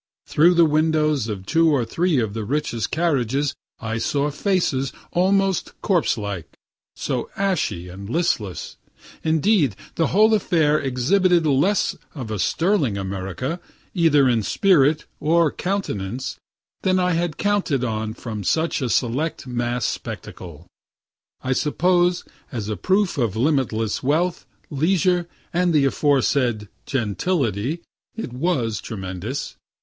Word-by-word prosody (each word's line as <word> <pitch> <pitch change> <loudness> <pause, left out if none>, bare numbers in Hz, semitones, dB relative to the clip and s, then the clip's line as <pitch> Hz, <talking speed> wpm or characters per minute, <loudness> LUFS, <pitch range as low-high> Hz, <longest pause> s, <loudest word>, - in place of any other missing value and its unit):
Through 170 +4 +4
the 170 -1 +6
windows 155 -4 +2
of 100 -4 -5
two 165 +7 +3
or 135 -6 +2
three 170 +4 +1
of 110 -4 -1
the 110 0 -3
richest 120 -3 -2
carriages 140 -4 0 0.3
I 115 0 -3
saw 145 +4 0
faces 145 -6 0 0.2
almost 195 +1 +1
corpse 180 - +2
like, 100 -6 -6 0.4
so - - -3
ashy 185 - -1
and 95 +3 -9
listless. 120 - -1 0.5
Indeed 160 - +2 0.2
the 165 - +2
whole 215 +4 +4
affair 160 -7 +2
exhibited 165 +7 +2
less 155 +8 +2 0.2
of 110 - -4
sterling 160 - +1
America, 95 - -4 0.3
either 155 -6 +4
in 120 -3 +2
spirit 150 - +3
or 165 0 +3
countenance, 130 - -3 0.4
than 185 0 +2
I 180 0 +2
had 170 -1 -1
counted 200 -10 0
on 110 -2 -2
from 110 -4 -6
such 160 - 0
a 125 - -1
select 130 +8 0
mass 120 -1 -2
spectacle. 85 -2 -6 0.8
I 130 - +1
suppose, 175 +5 +2 0.3
as 110 -5 -4
a 105 - -1
proof 190 - +1
of 115 -5 0
limitless 120 -5 0
wealth, 165 +6 0 0.2
leisure, 175 +3 +2 0.3
and 175 -1 +2
the 145 -2 +4
aforesaid 130 -6 +1 0.2
"gentility," 130 - -1 0.3
it 225 - -5
was 125 - -1
tremendous. 95 +5 -5
145 Hz, 125 wpm, -22 LUFS, 115-175 Hz, 0.8 s, the